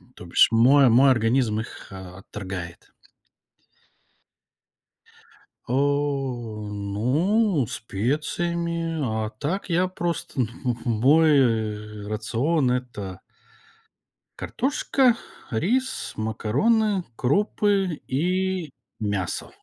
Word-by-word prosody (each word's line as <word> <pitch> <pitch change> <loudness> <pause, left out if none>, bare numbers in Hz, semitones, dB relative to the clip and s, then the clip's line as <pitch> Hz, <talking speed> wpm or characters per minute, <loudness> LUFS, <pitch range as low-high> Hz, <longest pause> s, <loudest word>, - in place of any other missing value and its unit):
То 90 - -11
бишь 85 - +5
мо 130 +4 +6
мой 130 +4 +6
организм 115 -2 +2
их 110 - -8
отторгает. 95 -1 -8 2.7
О, 130 -5 -1
ну, 135 - +1
специями. 165 - -2
А 110 -2 -1
так, 170 - -4
я 180 +2 +2
просто, 170 -6 -3 0.2
ну, 120 -2 0
мой, 135 +8 +4
э, 105 -3 -1
рацион- 125 +6 0
это 105 -7 -4 1.2
картошка, 265 -2 +1 0.3
рис, 240 - -1
макароны, 180 - +1
крупы 195 +3 +1
и 180 +3 0 0.3
мясо. 100 -4 -2
130 Hz, 75 wpm, -24 LUFS, 110-170 Hz, 2.7 s, мо